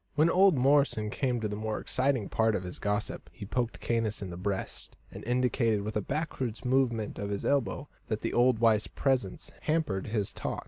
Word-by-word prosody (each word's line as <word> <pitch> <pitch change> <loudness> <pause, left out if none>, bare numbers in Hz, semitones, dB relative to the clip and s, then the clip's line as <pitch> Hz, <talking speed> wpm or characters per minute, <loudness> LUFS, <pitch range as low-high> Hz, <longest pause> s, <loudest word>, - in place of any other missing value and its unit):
When 155 +3 +4
old 190 -4 +5
Morrison 135 -5 +3
came 125 -1 0
to 110 - 0
the 105 - -4
more 110 0 -3
exciting 130 -5 0
part 110 -1 +2
of 95 - -2
his 90 -1 -7
gossip, 105 +1 -2
he 105 - -9
poked 120 +3 -2
Caius 115 -3 -1
in 95 - -6
the - - -6
breast, 95 +2 -4
and - - -9
indicated 120 -3 +1
by 110 - -2
a 105 - 0
backward 130 -3 -3
movement 125 -4 +1
of 100 0 -3
his 100 -1 -3
elbow 140 0 0 0.2
that 110 -1 -2
the - - -2
old 125 0 +4
wife's 110 -2 +3
presence 135 +3 -1
hampered 150 - 0
his 105 -2 -1
talk. - - -3
115 Hz, 195 wpm, -30 LUFS, 105-135 Hz, 0.2 s, old